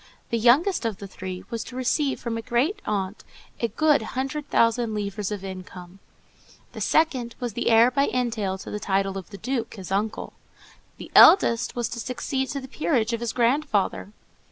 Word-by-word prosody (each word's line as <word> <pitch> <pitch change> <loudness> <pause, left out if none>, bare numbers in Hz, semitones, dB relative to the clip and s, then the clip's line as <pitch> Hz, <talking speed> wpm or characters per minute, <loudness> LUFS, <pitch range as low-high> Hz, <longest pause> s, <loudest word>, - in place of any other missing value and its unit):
The 230 - +1
youngest 275 - +4
of 225 -4 -2
the 200 - -8
three 185 -1 -7
was 230 -1 -3
to 250 - -10
receive 265 +2 0
from 235 -1 -4
a 225 - -3
grandaunt 230 - -1 0.4
a 235 - +1
good 300 +3 +2 0.2
hundred 280 +3 -3
thousand 230 -1 +2
livres 205 -1 -3
of 205 -2 -5
income; 185 -1 -9 0.7
the - - -8
second 255 -7 +1
was 245 -3 -3
the 240 - -1
heir 230 +2 +6
by 275 +3 +2
entail 225 -6 -1
to - - -9
the 210 - -3
title 195 -1 0
of 190 -2 -7
the 200 - -9
Duke, 235 +2 -3
his 190 -3 -9
uncle; 210 +3 -2 0.6
the - - -10
eldest 235 - +6
was 240 -2 -1
to 235 - -6
succeed 265 +2 -3
to 280 - -3
the 265 - -9
peerage 250 -5 0
of 230 - -1
his 235 -1 -2
grandfather. 235 -5 0
230 Hz, 180 wpm, -25 LUFS, 200-260 Hz, 0.7 s, heir